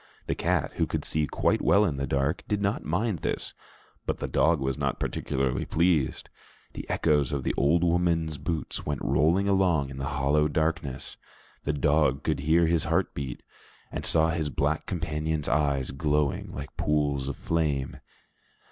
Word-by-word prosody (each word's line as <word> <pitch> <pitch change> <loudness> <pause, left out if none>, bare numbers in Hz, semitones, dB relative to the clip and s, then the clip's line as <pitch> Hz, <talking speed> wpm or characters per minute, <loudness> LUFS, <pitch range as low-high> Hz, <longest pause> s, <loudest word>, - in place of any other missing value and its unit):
The - - 0
cat, - - 0
who - - +1
could - - -3
see 75 -1 0
quite - - +1
well 105 +1 +4
in 75 -8 -1
the 70 0 -2
dark, 70 +4 0
did 105 - 0
not 100 +1 -1
mind 95 +3 -1
this, - - -3 0.5
but - - 0
the - - -3
dog 80 -1 +3
was 65 0 -1
not - - -2
particularly 65 -1 -1
pleased. 80 -5 +1 0.5
The - - -8
echoes 75 -3 +2
of 70 -2 -2
the - - 0
old 80 +5 +3
woman's 85 -3 +1
boots 80 -2 -3
went 75 -2 -3
rolling 85 +8 +3
along 90 -8 +2
in 65 - -8
the 70 - -2
hollow 75 +2 +3
darkness; 80 -3 -2 0.5
the 75 - +1
dog 70 -1 +2
could 75 -3 0
hear 80 +4 +3
his 80 -1 +1
heart - - +1
beat, 65 -3 -5 0.5
and - - -4
saw 80 0 +3
his 80 -2 -1
black 75 +2 -1
companion's 80 -3 -2
eyes 70 -4 +1
glowing 75 0 0
like 70 - -7
pools 70 -3 0
of 70 - -3
flame. 75 -5 -1
75 Hz, 170 wpm, -27 LUFS, 70-80 Hz, 0.5 s, well